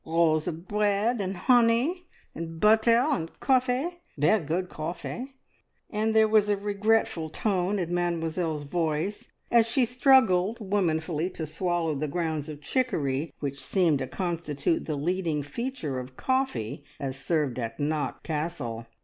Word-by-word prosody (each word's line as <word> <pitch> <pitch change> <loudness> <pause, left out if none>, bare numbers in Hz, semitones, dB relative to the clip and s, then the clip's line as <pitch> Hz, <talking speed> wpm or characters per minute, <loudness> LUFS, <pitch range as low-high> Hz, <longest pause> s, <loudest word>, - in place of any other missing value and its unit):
Rolls 160 -1 +2
of 170 +1 -5
bread, 210 +2 +1
and 190 -1 -3
honey, 245 - +3 0.3
and 165 0 -6
butter, 225 +4 +5
and 165 - -3
coffee 265 +7 +1 0.2
ver' 155 +10 +4
good 175 +3 -2
coffee!" 175 - -6 0.6
and 220 +1 0
there 220 0 +6
was 215 -1 +4
a 205 - +2
regretful 205 -3 +1
tone 190 +2 0
in 175 -2 -2
Mademoiselle's 165 -2 -1
voice, 160 +5 -2 0.2
as 230 -1 +5
she 245 +2 +2
struggled 235 -5 +4
womanfully 175 -5 0
to 165 -3 -5
swallow 165 0 -1
the 150 +2 -2
grounds 160 -1 -2
of 150 -1 -8
chicory 155 - -1
which 140 -1 -3
seemed 165 -2 +2
to 130 - -3
constitute 165 -4 -1
the 155 - -1
leading 165 -1 -1
feature 155 - -4
of 130 0 -9
coffee 260 - -1 0.2
as 135 -2 -3
served 135 -2 -1
at 115 -1 -4
Knock 150 0 -2
Castle. 150 -8 -3
175 Hz, 140 wpm, -27 LUFS, 155-220 Hz, 0.6 s, there